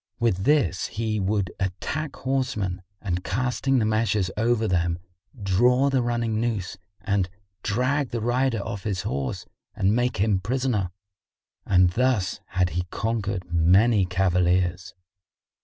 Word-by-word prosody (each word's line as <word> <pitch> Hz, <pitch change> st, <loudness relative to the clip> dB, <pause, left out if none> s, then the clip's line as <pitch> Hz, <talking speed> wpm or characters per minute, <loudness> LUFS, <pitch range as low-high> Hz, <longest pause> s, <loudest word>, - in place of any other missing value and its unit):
With 105 Hz, -5 st, +1 dB
this 120 Hz, -, +2 dB
he 110 Hz, -1 st, -2 dB
would 100 Hz, -1 st, 0 dB
attack 135 Hz, +11 st, -3 dB
horsemen 125 Hz, -9 st, -2 dB, 0.2 s
and 90 Hz, -2 st, -2 dB
casting 125 Hz, +5 st, 0 dB
the 115 Hz, -, +2 dB
meshes 110 Hz, -3 st, +1 dB
over 115 Hz, 0 st, +1 dB
them, 85 Hz, -3 st, +1 dB, 0.4 s
draw 125 Hz, +8 st, +3 dB
the 135 Hz, -2 st, +2 dB
running 120 Hz, -2 st, 0 dB
noose 110 Hz, -6 st, -2 dB, 0.3 s
and 100 Hz, -2 st, 0 dB, 0.3 s
drag 130 Hz, +5 st, 0 dB
the 120 Hz, -, -2 dB
rider 120 Hz, -1 st, +1 dB
off 100 Hz, -, -4 dB
his 100 Hz, -3 st, -2 dB
horse 70 Hz, -10 st, -3 dB, 0.3 s
and 100 Hz, +3 st, +2 dB
make 120 Hz, +1 st, 0 dB
him 100 Hz, 0 st, +2 dB
prisoner; 115 Hz, -2 st, -1 dB, 0.8 s
and 90 Hz, -2 st, +4 dB
thus 120 Hz, -4 st, +1 dB
had 90 Hz, -1 st, 0 dB
he 90 Hz, +1 st, -2 dB
conquered 100 Hz, -5 st, -2 dB
many 95 Hz, +5 st, +4 dB
cavaliers. 90 Hz, 0 st, +1 dB
105 Hz, 130 wpm, -25 LUFS, 95-120 Hz, 0.8 s, and